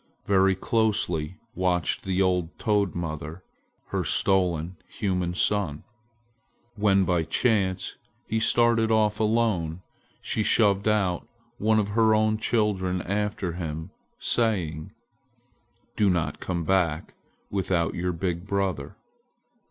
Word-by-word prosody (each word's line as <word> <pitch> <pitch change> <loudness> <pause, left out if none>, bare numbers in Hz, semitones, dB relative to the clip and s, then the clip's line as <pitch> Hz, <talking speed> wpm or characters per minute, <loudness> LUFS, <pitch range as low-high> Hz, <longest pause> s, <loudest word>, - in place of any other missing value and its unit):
Very 95 -1 +3
closely 95 -6 0 0.2
watched 90 -2 0
the 95 0 +1
old 90 -3 0
toad 105 -4 +1
mother 80 +1 -5 0.5
her - - -1
stolen 90 -3 +1
human 90 -3 -2
son. 90 -7 0 0.9
When 100 -3 +3
by 90 -1 +2
chance 95 +2 0 0.3
he 110 - -1
started 115 0 +3
off 110 -1 +2
alone, 105 -7 0 0.4
she 110 - -2
shoved 100 -2 +3
out 100 -4 +1 0.3
one 110 +1 +3
of 105 -2 +1
her 110 +1 +3
own 110 0 +2
children 95 -6 0
after 105 -2 -2
him, 80 0 -5 0.3
saying: 90 -10 0 1.0
"Do 105 -2 +3
not 80 -6 -1
come 85 -2 -3
back 85 -3 0 0.4
without 90 -4 0
your 90 +1 -1
big 85 +1 -3
brother." 95 -8 -2
95 Hz, 115 wpm, -26 LUFS, 85-105 Hz, 1.0 s, Very